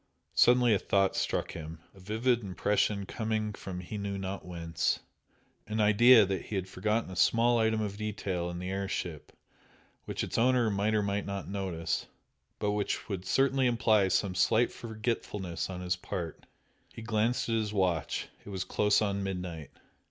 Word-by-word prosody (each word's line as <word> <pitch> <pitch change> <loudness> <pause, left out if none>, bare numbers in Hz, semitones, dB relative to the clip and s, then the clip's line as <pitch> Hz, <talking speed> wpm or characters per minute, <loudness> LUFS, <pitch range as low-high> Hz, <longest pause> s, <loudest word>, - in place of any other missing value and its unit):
Suddenly 120 -1 +5
a 100 - +3
thought 95 +1 +2
struck - - -1
him, 80 0 -7
a 95 - -17
vivid 115 +5 +1
impression 100 +1 0
coming 110 0 -2
from 90 -2 -6
he 105 +4 -6
knew 100 -1 -3
not 95 0 -4
whence 85 -2 -1 0.7
an 110 +1 -2
idea 110 +2 +7
that 95 0 -3
he 105 - -4
had 95 -1 -2
forgotten 105 +2 -1
a - - -7
small 115 +5 +4
item 110 -1 +2
of 100 -1 -3
detail 100 -5 -3
in 85 - -5
the 90 +1 -4
air 100 0 -2
ship 85 -5 -4 0.7
which - - -3
its - - -2
owner 120 -2 +3
might 100 +2 +1
or 105 - +2
might 100 0 -1
not 100 -1 -4
notice, 95 -5 -2 0.5
but 105 - 0
which 105 -1 -2
would 95 -2 -4
certainly 135 +4 +3
imply 110 -4 +3
some 95 +1 +1
slight 115 +5 +3
forgetfulness 110 -6 -3
on 90 -1 -5
his 90 0 0
part. 90 -2 -6 0.4
He 115 - -9
glanced 115 +2 0
at 115 - 0
his 110 -2 0
watch, 90 -7 0 0.2
it - - -11
was 95 -2 -3
close 105 +1 +2
on 100 -1 -1
midnight. 90 -5 -4
100 Hz, 175 wpm, -30 LUFS, 95-110 Hz, 0.7 s, idea